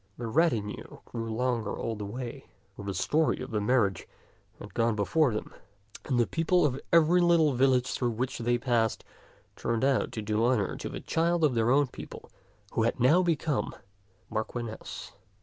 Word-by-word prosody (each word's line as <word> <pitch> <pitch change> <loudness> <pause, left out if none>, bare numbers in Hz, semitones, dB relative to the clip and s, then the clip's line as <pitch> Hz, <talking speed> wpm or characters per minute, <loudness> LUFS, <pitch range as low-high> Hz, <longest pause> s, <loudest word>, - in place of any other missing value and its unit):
The 120 - -5
retinue 115 -5 0
grew 115 -1 -5
longer 115 -2 -1
all 115 - -3
the 105 -1 -5
way, 125 +4 -7 0.3
for 100 - -9
the 100 - -3
story 155 - +1
of - - -6
the 105 -2 0
mar 115 0 +3
riage 95 - -8 0.5
had - - -11
gone 115 -1 +1
before 130 +7 +2
them, 105 - -5 0.5
and 125 -3 0
the 120 - +4
people 165 +3 +2
of 135 -2 -1
every 170 +2 +5
little 170 -4 +4
village 130 0 +2
through 125 - 0
which 125 +4 -3
they 120 +1 +1
passed 115 -3 0 0.5
turned 115 +2 -1
out 135 -1 +1
to 110 - -4
do 105 +1 0
honor 120 -5 +1
to - - -5
the - - -6
child 170 +1 +1
of 150 -4 +4
their 115 0 +2
own 140 +3 +4
people 130 - -10 0.4
who - - 0
had 115 +2 0
now 145 +9 +5
become 160 -4 0
their 100 - -18 0.6
Marchioness. 115 -1 -7
125 Hz, 185 wpm, -29 LUFS, 115-145 Hz, 0.6 s, every